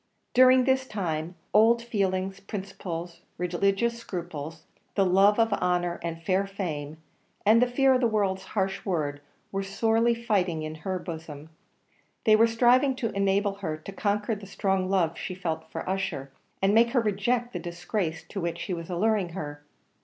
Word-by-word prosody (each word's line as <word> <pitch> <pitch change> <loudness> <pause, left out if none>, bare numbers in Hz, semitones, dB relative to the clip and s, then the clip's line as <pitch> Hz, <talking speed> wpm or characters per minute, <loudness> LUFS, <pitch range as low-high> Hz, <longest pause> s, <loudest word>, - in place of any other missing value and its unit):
During 255 0 +7
this 265 0 +1
time, 175 -5 -3 0.2
old 230 +2 +5
feelings, 195 -4 -1
principles, 185 -4 -6 0.2
religious 195 +6 0
scruples, 165 -6 -6 0.3
the 195 - +3
love 195 +3 +5
of 225 -2 +3
honour 180 -2 0
and 165 0 -5
fair 190 +3 +1
fame, 160 -7 -4 0.5
and 220 +3 +6
the 250 - +4
fear 265 +2 +4
of 255 - +2
the 240 - +4
world's 195 -4 0
harsh 190 0 0
word, 150 -7 -2 0.3
were 195 - -1
sorely 225 +4 +2
fighting 190 -8 0
in 155 0 -4
her 185 +1 -2
bosom; 160 -3 -8 0.7
they 215 - +6
were 225 +2 +5
striving 250 +4 +4
to 230 -4 -2
enable 200 0 +1
her 160 -5 -2
to 155 +5 -9
conquer 205 +2 0
the 205 -2 -7
strong 190 -1 0
love 175 -4 +1
she 185 - -5
felt 160 -3 -4
for - - -6
Ussher, 185 -8 -2 0.3
and 195 +1 +4
make 235 +2 +4
her 255 - +4
reject 235 +4 0
the - - -3
disgrace 175 -1 -3
to 195 - -4
which 170 0 -3
he 190 - -3
was 170 0 -6
alluring 195 +1 +1
her. 145 -5 -6
195 Hz, 170 wpm, -27 LUFS, 170-220 Hz, 0.7 s, During